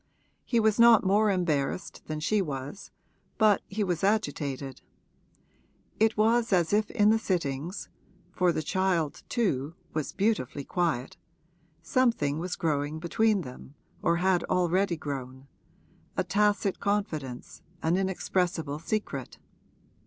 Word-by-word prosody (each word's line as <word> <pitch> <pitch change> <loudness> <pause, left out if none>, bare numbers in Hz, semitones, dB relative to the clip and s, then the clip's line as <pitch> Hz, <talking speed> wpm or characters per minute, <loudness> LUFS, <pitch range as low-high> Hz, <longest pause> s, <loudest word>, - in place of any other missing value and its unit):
He 235 - +1
was 220 0 +2
not 235 -2 +7
more 210 +3 +4
embarrassed 170 -3 -1
than 155 0 -3
she 205 +7 +1
was, 145 +3 -5 0.5
but 215 -2 +4
he 210 +2 -2
was 175 -3 -2
agitated: 145 - -1 1.2
it 220 0 +3
was 225 +2 +3
as 175 -1 +2
if 210 0 +2
in 210 -2 +4
the 225 - +3
sittings 170 -3 -2 0.4
(for 180 -1 +2
the 160 - -2
child, 175 -3 0
too, 165 - 0 0.2
was 155 -2 -2
beautifully 195 - -1
quiet) 160 -7 -1 0.7
something 165 - +1
was 180 +2 -3
growing 150 -3 -1
between 200 +5 +1
them 130 0 -10 0.3
or 170 - +2
had 180 0 +2
already 180 0 +1
grown 135 -3 -6 0.7
a - - +2
tacit 205 -1 +1
confidence, 155 - -3 0.2
an 165 +2 +2
inexpressible 180 -5 -1
secret. 165 - -3
180 Hz, 125 wpm, -28 LUFS, 150-205 Hz, 1.2 s, not